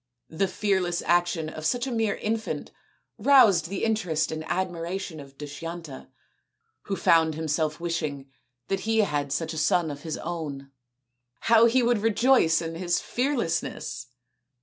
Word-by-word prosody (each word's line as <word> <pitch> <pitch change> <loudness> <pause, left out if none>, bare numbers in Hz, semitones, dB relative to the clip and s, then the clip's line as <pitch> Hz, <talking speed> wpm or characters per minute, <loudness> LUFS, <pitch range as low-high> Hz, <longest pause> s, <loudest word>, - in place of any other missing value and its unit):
The 175 +5 0
fearless 185 -3 0
action 175 -2 +1
of 155 0 -7
such 245 +9 0
a 265 - -4
mere 225 -3 0
infant 225 +1 -3 0.5
roused 205 - +5
the 195 - -3
interest 180 -9 0
and 160 0 -4
admira 175 0 -2
tion 170 -5 -7
of 135 -1 -13
Dushyanta, 150 0 -7 0.8
who 195 - -2
found 160 -4 +3
himself 155 0 -1
wishing 155 -5 -3 0.4
that 195 - -1
he 225 +2 +2
had 145 -7 -1
such 165 +3 -2
a 160 - -3
son 160 +1 +2
of 145 0 -8
his 160 0 -4
own. 150 -5 -5 0.7
How 230 0 +6
he 250 +2 +3
would 235 -2 +2
rejoice 225 -6 +3
in 165 0 -4
his 175 +1 0
fearlessness 230 - -2
170 Hz, 150 wpm, -26 LUFS, 155-210 Hz, 0.8 s, How